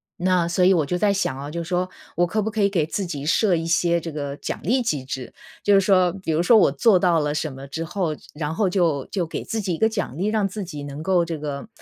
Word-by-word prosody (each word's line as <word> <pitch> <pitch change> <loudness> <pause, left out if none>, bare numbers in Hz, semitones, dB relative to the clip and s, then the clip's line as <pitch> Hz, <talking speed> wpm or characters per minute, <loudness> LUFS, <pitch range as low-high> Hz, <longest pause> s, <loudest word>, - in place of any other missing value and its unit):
那 180 -1 +1
所 175 +2 +1
以 190 +1 +6
我 160 -4 +2
就 180 +5 -1
在 205 +2 +2
想 135 -9 -1
啊， 145 +2 -6
就 170 - -3
说 180 +2 -1 0.3
我 175 - +3
可 215 +5 -1
不 215 - -1
可 215 0 -2
以 200 - +4
给 175 -6 +1
自 190 +5 -3
己 145 -5 -5
设 185 +4 +3
一 165 - -3
些 170 0 +2
这 165 -1 -7
个 145 -1 -4
奖 - - -5
励 250 +8 +2
机 150 - -1
制。 130 -1 -6 0.3
就 205 - +3
是 195 - +6
说， 185 -3 +3
比 160 - -1
如 155 - +2
说 225 +6 +6
我 185 - +5
做 185 +9 +4
到 175 -2 +3
了 150 -1 -1
什 155 -1 -2
么 135 +1 -9
之 160 +4 -4
后， 170 -2 -2 0.2
然 150 +1 -3
后 195 +1 +2
就 165 -7 +1
就 180 -4 -2
给 - - -5
自 225 0 -3
己 185 -4 -1
一 - - -7
个 220 - +3
奖 205 - -4
励， 190 - -1
让 215 -2 +1
自 200 +2 -5
己 150 -5 -7
能 145 +2 -7
够 180 -2 +2
这 165 -1 -4
个 145 +4 -5
170 Hz, 300 characters per minute, -23 LUFS, 150-195 Hz, 0.3 s, 以